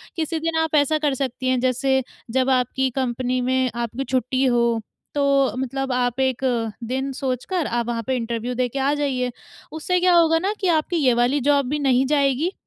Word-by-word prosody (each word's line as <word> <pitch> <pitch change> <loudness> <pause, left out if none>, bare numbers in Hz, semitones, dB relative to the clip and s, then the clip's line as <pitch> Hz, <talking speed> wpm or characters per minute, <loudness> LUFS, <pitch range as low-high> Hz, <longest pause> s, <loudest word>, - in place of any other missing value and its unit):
किसी 325 -1 -2
दिन 325 0 -1
आप 320 -1 -1
ऐसा 300 +1 +3
कर 295 -2 +1
सकती 260 -1 -3
हैं 255 - +2
जैसे 260 +1 +1 0.3
जब 260 +2 +1
आपकी 260 +1 +1
कंपनी 255 -1 -1
में 260 +1 +1
आपकी 235 +2 -3
छुट्टी 260 0 0
हो, 235 -2 +2 0.4
तो 280 -1 +2
मतलब 265 +1 -3
आप 250 0 0
एक 260 -2 0 0.4
दिन 265 +4 -2
सोचकर 270 +6 -2
आप 235 0 -1
वहाँ 230 -1 -2
पे 260 - +1
इंटरव्यू 235 0 -3
दे 250 0 +1
के 275 - -4
आ 275 +2 +2
जाइए। 265 -4 -1 0.4
उससे 335 +4 -1
क्या 360 0 +4
होगा 325 -1 +4
ना 390 +4 -1
कि 380 - 0
आपकी 335 +1 +1
ये 265 -6 +3
वाली 245 +4 +2
जॉब 280 -1 +3
भी 300 +2 -1
नहीं 265 -2 +2
जाएगी 285 +3 +1
265 Hz, 195 wpm, -22 LUFS, 250-290 Hz, 0.4 s, क्या